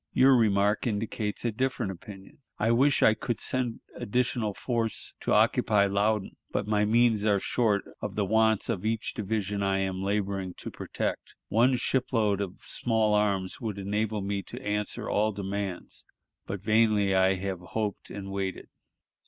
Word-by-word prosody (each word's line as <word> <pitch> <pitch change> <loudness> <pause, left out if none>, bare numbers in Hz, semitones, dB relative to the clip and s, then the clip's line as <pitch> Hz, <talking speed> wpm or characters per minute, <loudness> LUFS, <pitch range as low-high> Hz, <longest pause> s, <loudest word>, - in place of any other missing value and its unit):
Your 135 +1 +6
remark 105 -1 +2
indicates 105 0 -2
a 120 - +2
different 125 -3 -1
opinion.... 95 +4 -12 0.2
I 110 +2 +2
wish 135 +4 +3
I 110 - +7
could 115 +1 -3
send 125 -3 -2
additional 115 -2 -1
force 115 -3 -2
to - - -2
occupy 100 -2 +4
Loudon, 100 +1 0
but - - -1
my 105 0 +2
means 115 -1 +3
are 105 -2 +3
short 105 -2 +1 0.2
of 105 -1 -4
the 105 - +1
wants 110 +1 +2
of 105 -6 -2
each 110 0 -1
division 105 -1 -2
I 95 -1 +1
am 95 -1 -2
laboring 100 -2 -2
to - - -7
protect. - - -4
One 120 +4 +4
ship 125 +1 0
load 105 -4 +2
of 95 -2 -6
small 110 -3 +1
arms 100 -2 0
would 110 -4 -3
enable 105 +2 -1
me 100 0 -2
to - - -8
answer 105 0 -2
all 110 +1 +1
demands, 100 -2 -4 0.4
but 100 -1 -5
vainly 110 -2 +3
have 95 -1 +1
I - - -13
hoped 105 -2 -3
and 95 -1 -7
waited." 95 -1 -4
105 Hz, 160 wpm, -28 LUFS, 100-110 Hz, 0.4 s, I